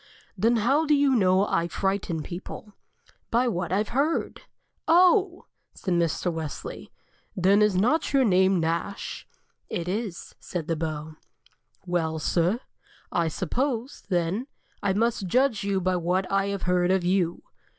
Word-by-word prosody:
"Then 230 +2 +2
how 270 +8 +2
do 300 - +5
you 285 -1 +3
know 190 -2 +4
I 170 -4 0
frighten 190 -3 -2
people?" 190 +4 -8 0.6
"By 245 +2 +2
what 175 -6 -2
I 190 - +2
have 210 +1 -1
heard." 290 +6 -1 0.5
"Oh!" 360 +2 +4 0.3
said 185 - -2
Mr. 170 +1 0
Wesley. 160 -3 -6 0.4
"Then 195 +3 +4
is 210 -2 +3
not 245 - +2
your 275 -2 +4
name 190 -2 +4
Nash?" 165 +4 -3 0.4
"It 170 -1 -3
is," 200 -1 -4
said 170 -4 -5
the 165 - 0
Beau. 155 -1 -5 0.7
"Well, 165 -3 -1
sir, 175 +8 +1 0.5
I 170 -1 +1
suppose, 245 - -2
then, 180 +7 0 0.3
I 200 -1 +1
must 225 -1 0
judge 250 +1 +2
you 200 -1 0
by 185 0 0
what 180 +2 0
I 195 0 +2
have 200 -2 -3
heard 180 -1 +2
of 190 -1 +2
you." 175 -1 0
190 Hz, 150 wpm, -26 LUFS, 175-230 Hz, 0.7 s, do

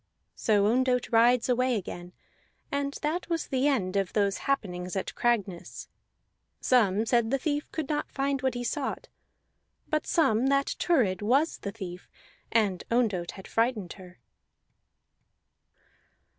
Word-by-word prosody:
So 205 -2 +2
Ondott 250 +3 +1
rides 235 +1 +4
away 250 0 +2
again, 175 -3 -6 0.6
and 280 0 -2
that 325 +5 -2
was 335 -2 -1
the 265 +1 +1
end 200 -10 0
of 195 -2 0
those 200 -2 +1
happenings 180 -9 -1
at 190 - -3
Cragness. 205 -7 -2 0.7
Some 220 -4 +3
said 235 -1 +2
the 275 - +2
thief 290 +2 -2
could 315 -4 -3
not 295 0 -2
find 275 -1 -1
what 260 -2 0
he 245 - -3
sought; 270 +3 -3 0.8
but 305 0 0
some 255 -6 +3
that 275 0 +1
Thurid 225 - +2
was 270 +10 +2
the 200 - -5
thief, 180 -4 -8 0.4
and 205 -5 +1
Ondott 210 -8 0
had 190 - -11
frighted 225 -6 0
her. 180 -2 -14
235 Hz, 135 wpm, -28 LUFS, 200-275 Hz, 0.8 s, rides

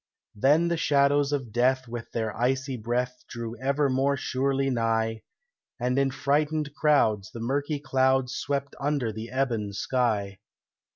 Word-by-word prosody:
Then 145 +10 +3
the 170 - 0
shadows 145 -2 +3
of 135 -6 -2
death 130 +3 +2
with 115 0 -7
their 110 -2 -2
icy 130 +2 0
breath 125 +2 -2
Drew 115 -1 -5
ever 140 +2 +1
more 135 +2 +1
surely 135 +1 0
nigh, 115 -2 0 0.6
And 125 +2 +1
in 135 0 +2
frightened 150 +2 0
crowds 110 -10 +2
the 115 - -9
murky 140 +5 -1
clouds 130 -2 +1
Swept 140 0 -2
under 140 -5 -1
the 110 +2 -6
ebon 120 -6 -1
sky. 105 -4 -1
130 Hz, 140 wpm, -27 LUFS, 115-140 Hz, 0.6 s, Then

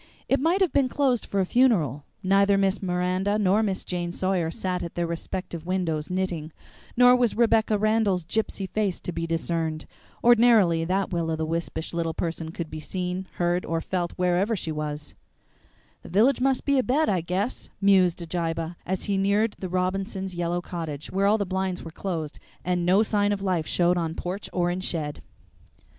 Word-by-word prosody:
It 270 - +2
might 335 +7 +2
have 370 - +2
been 275 -3 +3
closed 260 -4 +1
for 200 - -1
a - - +1
funeral. 180 - +2 0.2
Neither 195 +1 +4
Miss 195 0 +1
Miranda 185 +2 0
nor 205 0 +3
Miss 195 -4 -2
Jane 175 -1 -3
Sawyer 185 -2 0
sat 180 +2 -3
at 170 - -6
their 175 - 0
respective 170 0 -5
windows 165 -5 -1
knitting, 180 -4 -2 0.5
nor 250 0 +7
was 245 -3 +1
Rebecca 225 -2 +3
Randall's 210 -4 +1
gypsy 210 -1 -2
face 200 -2 -1
to - - -5
be 165 -1 -3
discerned. 165 -1 -2 0.4
Ordinarily 225 -9 +5
that 190 +2 0
will 170 -1 -1
o' 160 - 0
the 160 0 -2
wispish 165 0 -3
little 165 -1 -2
person 165 -1 -3
could 165 -1 -6
be 155 - -5
seen, 180 +3 -4
heard, 175 +1 +1
or 165 0 -1
felt 175 0 -2
wherever 180 +5 +1
she 165 -5 -4
was. 150 -1 -5 0.9
"The - - -12
village 230 +9 +3
must 265 0 +1
be 280 -1 +3
abed, 270 +5 +2
I 185 -4 +1
guess," 185 +8 -3
mused 185 -3 +3
Abijah, 165 0 -3
as 190 +1 -2
he 200 -2 0
neared 205 +3 +2
the 185 - -4
Robinsons' 190 +1 -2
yellow 175 0 -1
cottage, 160 -5 -6
where 195 +1 +2
all 210 +2 +4
the 200 - -1
blinds 190 -1 -2
were 165 - -8
closed 165 -4 -4 0.3
and 180 -1 0
no 195 +4 +5
sign 205 -2 +1
of 200 -1 -2
life 180 -5 0
showed 175 0 +2
on 165 -1 -2
porch 185 +4 -4
or 175 -1 +1
in 180 - -2
shed. 155 -5 -3
185 Hz, 185 wpm, -26 LUFS, 170-205 Hz, 0.9 s, nor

